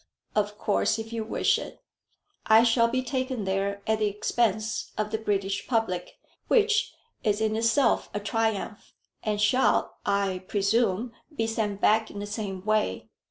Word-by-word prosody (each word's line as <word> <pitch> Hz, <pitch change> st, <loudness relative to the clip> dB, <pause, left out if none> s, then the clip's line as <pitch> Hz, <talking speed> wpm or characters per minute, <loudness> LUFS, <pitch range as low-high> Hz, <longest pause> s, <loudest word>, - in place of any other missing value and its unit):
"Of 210 Hz, 0 st, 0 dB
course 210 Hz, +1 st, +1 dB
if 225 Hz, +1 st, -6 dB
you 225 Hz, -1 st, -2 dB
wish 215 Hz, -, +1 dB
it." -, -, -9 dB, 0.7 s
"I 220 Hz, +1 st, +7 dB
shall 230 Hz, 0 st, +4 dB
be 255 Hz, +2 st, -1 dB
taken 255 Hz, -2 st, -2 dB
there 195 Hz, +1 st, -1 dB
at 220 Hz, 0 st, +1 dB
the 215 Hz, -, +2 dB
expense 215 Hz, +1 st, -1 dB
of 210 Hz, 0 st, -1 dB
the 220 Hz, -, -1 dB
British 200 Hz, -2 st, -1 dB
public, 205 Hz, -7 st, -1 dB, 0.3 s
which 440 Hz, -1 st, +3 dB, 0.3 s
is 210 Hz, -2 st, +1 dB
in 220 Hz, 0 st, 0 dB
itself 230 Hz, +3 st, +2 dB
a 205 Hz, -, -3 dB
triumph, 220 Hz, 0 st, -2 dB, 0.3 s
and 210 Hz, -1 st, -1 dB
shall, 250 Hz, +5 st, +2 dB
I 200 Hz, -2 st, 0 dB
presume, 220 Hz, +2 st, +1 dB, 0.2 s
be 225 Hz, -, 0 dB
sent 215 Hz, -3 st, -2 dB
back 220 Hz, +1 st, +3 dB
in -, -, -10 dB
the 205 Hz, -, -4 dB
same 205 Hz, -3 st, -5 dB
way. 215 Hz, -, 0 dB
215 Hz, 160 wpm, -27 LUFS, 200-230 Hz, 0.7 s, I